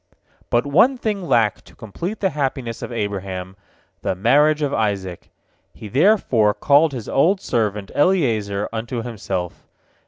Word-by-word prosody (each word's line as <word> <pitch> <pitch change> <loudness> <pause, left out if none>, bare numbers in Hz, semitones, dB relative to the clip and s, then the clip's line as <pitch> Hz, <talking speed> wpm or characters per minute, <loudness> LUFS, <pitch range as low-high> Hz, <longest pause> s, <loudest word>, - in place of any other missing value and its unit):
But 120 +2 +2
one 215 - +4
thing 215 -4 -2
lacked 115 -6 +2
to - - -18
complete 170 - -6
the 190 -2 +1
happiness 135 -5 -3
of - - -6
Abraham, 95 -4 -4 0.5
the - - -1
marriage 150 +9 +3
of 140 -1 -1
Isaac. 100 -5 -2 0.5
He 105 - -9
therefore 130 - +3
called 145 +2 +4
his 120 -5 -6
old 180 +8 +2
servant 105 - -2
Eliezer 115 - +1
unto 115 +1 -4
himself. 95 -6 -5
120 Hz, 135 wpm, -21 LUFS, 105-150 Hz, 0.5 s, one